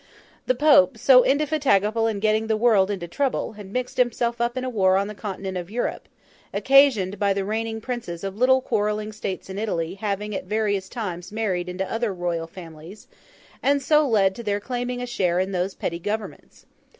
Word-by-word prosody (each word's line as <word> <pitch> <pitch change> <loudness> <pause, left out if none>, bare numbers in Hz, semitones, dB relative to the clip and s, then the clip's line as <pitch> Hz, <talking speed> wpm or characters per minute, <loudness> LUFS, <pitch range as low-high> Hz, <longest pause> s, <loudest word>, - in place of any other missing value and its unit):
The - - +2
Pope, 290 -4 +5
so 250 +2 +6
indefatigable 265 -7 +2
in 215 -3 -2
getting 215 +1 +1
the 220 -1 +1
world 215 -4 +4
into 185 -4 -4
trouble, 270 +10 -1
had 205 -2 -11
mixed 250 +2 -3
himself 235 -1 0
up 240 +2 -1
in 255 - -2
a - - -2
war 190 -6 +3
on 200 - +1
the 210 - -6
continent 195 -1 -5
of 175 0 -8
Europe, 240 +3 -3 0.4
occasioned 245 -9 +4
by 200 -1 +2
the 195 0 -2
reigning 220 +1 -3
Princes 225 -9 -5
of 195 -1 -4
little 260 +3 +4
quarrelling 210 -3 -1
states 200 -3 -5
in 190 +1 -6
Italy 170 -6 -2
having 205 +1 -3
at 190 - -4
various 205 -1 -1
times 185 -8 -5
married 190 -5 -2
into 185 +1 -3
other 225 +2 -1
Royal 170 -2 -2
families, 165 +2 -12 0.5
and 280 +1 +3
so 300 +2 +3
led 200 -5 +3
to 235 - -8
their 205 -2 -1
claiming 245 +2 -4
a - - -2
share 180 -7 0
in 190 +1 -1
those 185 +1 -2
petty 170 - -3
Governments. 210 +3 -6
210 Hz, 190 wpm, -24 LUFS, 190-240 Hz, 0.5 s, so